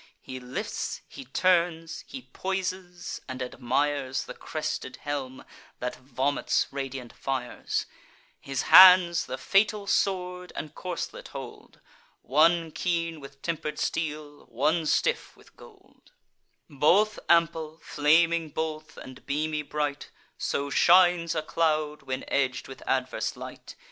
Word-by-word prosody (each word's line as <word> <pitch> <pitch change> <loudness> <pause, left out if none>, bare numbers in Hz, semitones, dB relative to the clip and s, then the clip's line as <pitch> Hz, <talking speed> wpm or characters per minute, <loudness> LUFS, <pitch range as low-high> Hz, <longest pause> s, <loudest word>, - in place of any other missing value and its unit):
He 130 0 -8
lifts, 125 0 -4
he 135 - -10
turns, 170 +2 +1
he 265 -2 -8
poises, 185 -2 -4
and 130 0 -5
admires 130 +2 -1
The - - -8
crested - - -4
helm, 135 -3 -4 0.3
that 125 0 -4
vomits 135 +2 0
radiant 135 -3 -5
fires: 130 -2 -3 0.5
His 135 -1 -3
hands 180 -2 +8
the 130 - -4
fatal 200 +6 +2
sword 180 -2 -1
and 150 - -6
corslet 180 -2 -5
hold, - - -10 0.4
One 165 +4 +3
keen 165 -1 -2
with 135 -1 -13
temper'd 155 -2 -3
steel, 150 -2 -3
one 150 +7 0
stiff - - 0
with - - -21
gold: - - -19 0.6
Both 185 +10 +3
ample, 165 -2 +2
flaming 165 +2 +3
both, 155 0 -5
and 130 -1 -11
beamy 150 +2 -1
bright; 145 -1 -3 0.3
So 140 0 -2
shines 175 -1 +5
a 155 - -1
cloud, 155 -2 0
when 130 0 -4
edg'd 130 -2 0
with 135 - -10
adverse 130 -1 -1
light. - - -9
155 Hz, 120 wpm, -27 LUFS, 135-170 Hz, 0.6 s, hands